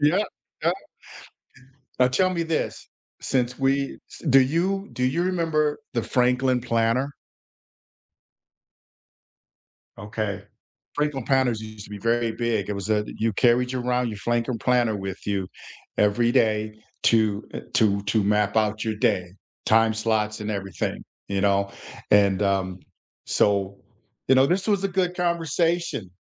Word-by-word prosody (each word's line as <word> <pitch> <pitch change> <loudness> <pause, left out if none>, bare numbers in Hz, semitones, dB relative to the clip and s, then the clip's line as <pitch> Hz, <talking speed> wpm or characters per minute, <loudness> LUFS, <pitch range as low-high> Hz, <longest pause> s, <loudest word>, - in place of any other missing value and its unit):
Yep, 180 +8 +3 0.3
yep. - - +2 1.3
Now 125 - +6
tell 185 +9 +2
me 170 -2 -1
this. 160 -1 -3 0.3
Since 125 -1 0
we 135 +1 0
s - - -9
do 135 +1 +7
you 185 +9 0
do 125 - -2
you 165 +7 +1
remember 160 -5 +1 0.2
the 115 - 0
Franklin 125 0 +2
Planner? 115 +4 0 2.9
Okay. 105 -1 -4 0.5
Franklin 150 -4 -1
Planners 130 -4 +2
used 110 -1 -9
to - - -14
be 105 - -6
very 115 +1 +1
big. 115 -4 -1
It - - -1
was 100 +2 -4
a 105 -1 +2
you 115 0 0
carried 125 +3 +3
around 125 -1 0
your 105 -2 -6
Franklin 120 +2 -1
Planner 120 -4 +2
with 95 -1 -6
you 100 -2 -1 0.5
every 110 +3 +3
day 110 -4 +1 0.3
to, 110 -2 +3
uh, - - -3
to 100 -2 +3
to 105 +2 +1
map 105 +1 +1
out 110 0 +1
your 110 -1 -2
day, 90 -3 0 0.3
time 110 0 +4
slots 110 -1 0
and 105 - -3
everything. 95 -4 -4 0.2
You 100 -1 -1
know? 100 0 +2 0.4
And, 100 -1 +4
um, 95 -2 0 0.4
so, 100 -1 +1 0.5
you 130 - +6
know, 130 +1 +5
this 185 +5 0
was 200 -3 +2
a - - +2
good 180 -1 0
conversation. 170 - 0
115 Hz, 140 wpm, -24 LUFS, 105-135 Hz, 2.9 s, do